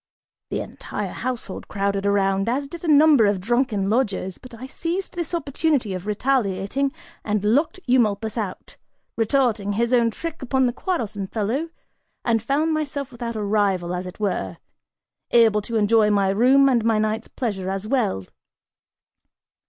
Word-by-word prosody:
The - - -2
entire - - -6
household 245 -6 -5
crowded 200 0 -1
around, 195 0 +2
as 275 +4 -1
did 340 +4 -9
a - - -3
number 290 -6 +6
of 200 -2 +1
drunken 225 -1 0
lodgers, 200 -5 -1
but 255 - -13
I 240 +3 -8
seized 340 +7 -3
this 340 -3 -4
opportunity 285 - 0
of 185 +2 -6
retaliating 225 +2 0 0.3
and 210 -1 -1
locked 285 - +2
Eumolpus 220 -4 +1
out, 205 -6 -5 0.4
retorting 225 -3 +1
his 235 +4 0
own 235 -2 +4
trick 330 +8 -6
upon 260 0 +1
the 245 - 0
quarrelsome 225 - -3
fellow, 230 - -2 0.6
and 225 -2 +2
found 290 +7 +1
myself 285 -3 -3
without 235 -1 -5
a 215 - -2
rival, 200 -4 +1
as 180 +1 -4
it 180 - -10
were, 95 - -2 0.7
able 225 -3 +4
to 230 +3 -5
enjoy 215 0 +4
my 200 -2 +2
room 255 +7 +5
and 245 -4 +3
my 225 -1 +2
night's 215 +1 -1
pleasure 195 -7 -3
as 195 +1 -3
well. 215 - 0
225 Hz, 155 wpm, -23 LUFS, 200-265 Hz, 0.7 s, number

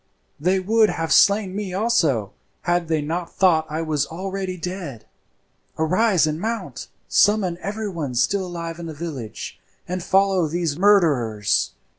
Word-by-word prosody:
They 185 +5 +2
would 215 +3 +3
have 165 -1 -1
slain 200 -2 +4
me 200 -3 -4
also 160 - +1 0.3
had 175 -1 0
they 155 -2 0
not 170 +3 -3
thought 160 -4 +3
I 155 +2 -2
was 150 -3 0
already 190 +2 -4
dead. 170 - -6 0.7
Arise 185 +1 +3
and 155 +1 -2
mount, 210 - -4 0.2
summon 195 -5 +3
everyone 190 - -4
still 190 +10 +1
alive 170 -1 -6
in 170 - -6
the 160 - -7
village, 145 -9 -6 0.3
and 180 +1 -3
follow 190 -1 +2
these 165 -1 -1
murderers. 150 - +2
175 Hz, 140 wpm, -22 LUFS, 155-195 Hz, 0.7 s, slain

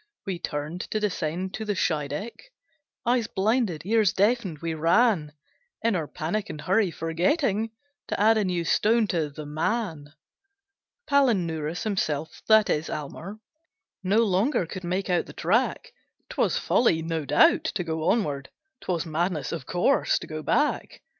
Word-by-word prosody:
We 190 -4 -3
turned 155 +2 -4
to 215 - -1
descend 185 -2 -2
to 220 - -4
the 210 -2 -1
Scheideck, 165 - -3 0.5
Eyes 240 -1 +2
blinded, 205 - 0
ears 215 -1 +3
deafened, 205 -4 +1
we 165 +2 -3
ran, 165 0 +3 0.5
In 230 -3 +2
our 160 -4 -2
panic 185 +9 -3
and 150 - -6
hurry, 190 +5 +2
forgetting 195 - 0 0.4
To - - -3
add 220 +2 +5
a 215 - +2
new 180 -3 -1
stone 225 +5 +3
to 160 -4 0
the 150 +1 -8
man. 155 -1 -2 0.9
Palinurus 175 - +1
himself 160 -8 -2
that 220 -1 +6
is 155 +1 -1
Almer 170 +8 -6 0.6
No 205 +5 +3
longer 200 - +1
could 185 +3 -7
make 185 +2 -2
out 175 - +1
the - - -10
track; - - 0 0.4
'Twas - - +1
folly, 165 -9 +2
no 165 -1 -2
doubt, 325 - +4
to 200 - -1
go 160 0 -1
onward; 145 - 0 0.3
'Twas 175 -3 -2
madness, 160 -2 -1
of 160 -5 -5
course, 180 +10 +2
to - - -6
go 155 0 -6
back. 295 - 0
180 Hz, 150 wpm, -26 LUFS, 160-220 Hz, 0.9 s, that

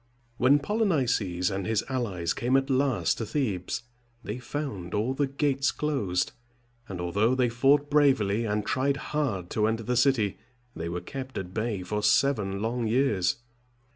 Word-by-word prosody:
When 130 +4 +5
Polynices 130 - 0
and 95 -1 -3
his 110 0 0
allies 100 -11 -1
came 125 +3 +2
at 135 0 0
last 130 -2 +1
to 115 - -2
Thebes, 120 - -2 0.4
they 105 +4 -5
found 120 -10 -5
all 110 +5 0
the 140 +1 0
gates 140 0 +1
closed; 120 -13 -1 0.6
and 95 -2 -5
although 100 +8 +1
they 125 -2 +2
fought 140 +5 +3
bravely, 130 -8 +3
and 105 -1 -1
tried 135 +2 +1 0.2
hard 110 - -1
to 110 -1 +2
enter 115 +1 -1
the 125 +2 -1
city, 120 -6 +2 0.4
they 85 +1 -4
were 90 +1 -3
kept 135 -1 -7
at 90 -1 -5
bay 110 -3 -2
for 105 +3 -2
seven 105 -3 +2
long 115 0 -1
years. 110 -7 +2
120 Hz, 160 wpm, -27 LUFS, 100-135 Hz, 0.6 s, When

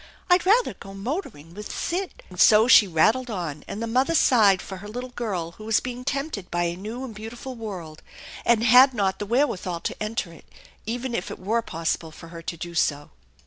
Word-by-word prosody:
I'd 360 +1 +4
rather 465 +5 +4
go 195 0 -12
motoring 200 - -5
with 210 +2 -8
Sid 365 +2 -4
" - - -26
And 180 - -10
so 220 +2 +7
she 215 -5 +8
rattled 220 +10 +2
on, 170 -8 -4
and 215 - -5
the - - -1
mother 260 +8 +1
sighed 210 - +5
for 190 - -8
her 205 +3 -10
little 245 +4 -6
girl 195 -9 -3
who 215 - -13
was 220 -1 +2
being 250 0 -6
tempted 275 - -3
by 175 0 0
a 170 0 -1
new 220 +8 -6
and 240 - -8
beautiful 225 +5 -8
world, 185 -9 -8 0.4
and 230 -1 +3
had 250 +3 +7
not 195 -3 0
the 205 - -4
wherewithal 195 -8 0
to - - -5
enter 215 -5 -3
it, - - -16 0.4
even 245 +2 -3
if 190 - -3
it - - -7
were 220 +5 0
possible 165 -4 -3
for 165 +1 -12
her 165 0 -9
to 170 0 -5
do 170 +1 -7
so. 145 -3 0
215 Hz, 215 wpm, -24 LUFS, 175-245 Hz, 0.4 s, she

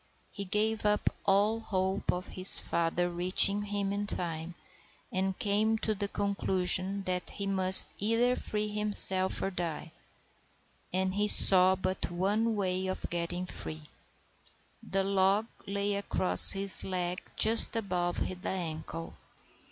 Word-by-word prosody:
He 200 - -9
gave 215 +3 -3
up 210 0 -1 0.2
all 205 +3 0
hope 190 -2 -4
of 180 +1 -7
his 185 +1 +9
father 170 +1 -3
reaching 185 +3 +2
him 205 -1 -5
in 205 0 -5
time, 170 -2 -5 0.6
and 190 0 -4
came 215 0 -2
to 220 0 -4
the 200 0 -5
conclusion 195 -1 -3
that 180 -1 -6
he 200 - -8
must 190 -1 +5
either 230 +4 -1
free 210 -3 -5
himself 205 -3 -1
or 195 - -4
die; 170 -3 -7 1.0
and 185 0 -3
he 205 +1 -2
saw 185 -2 +5
but 185 0 -5
one 205 +6 -3
way 190 -2 -4
of 185 - -7
getting 175 +1 -5
free. 80 - -8 1.0
The 195 0 -4
log 195 +2 -1 0.2
lay 200 +1 -4
across 200 -2 +6
his 195 0 +1
leg 180 -1 -6
just 225 +1 +6
above 180 -5 -4 0.2
the - - -6
ankle. 165 -2 -8
190 Hz, 135 wpm, -27 LUFS, 180-205 Hz, 1.0 s, his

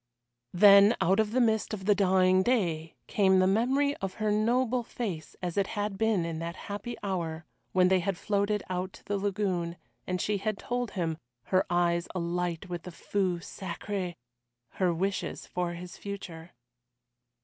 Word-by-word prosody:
Then 200 +3 +8
out 190 +5 +3
of 220 -1 +2
the 255 - +2
mist 220 -2 +2
of 190 -2 -9
the 205 - +5
dying 185 -1 +4
day 170 -9 0
came 190 -2 +3
the 185 - +5
memory 260 +9 +2
of 195 -1 -4
her 215 -1 0
noble 240 +4 +2
face 190 -10 -5
as 175 0 -3
it 195 -1 +2
had 205 -1 -1
been 220 -6 +2
in 165 -1 -4
that 170 +1 -4 0.2
happy 205 +4 -5
hour 170 -5 -3 0.3
when 185 -1 +4
they 190 0 +4
had 190 0 -2
floated 205 0 0
out 185 0 -3
to - - -15
the 205 -1 -1
lagoon, 185 -4 -1 0.3
and 180 0 -1
she 210 +2 0
had 215 0 -2
told 245 +1 -2
him 165 -4 -2 0.2
her 185 +8 +1
eyes 170 0 +1
alight 175 0 -2
with 175 -2 -4
the 180 - -9
feu 185 +1 -1
sacré 185 0 -5 0.5
her 185 -2 +1
wishes 190 +4 -2
for 175 -1 -2
his 175 0 -9
future. 175 -4 -7
190 Hz, 170 wpm, -29 LUFS, 175-210 Hz, 0.5 s, Then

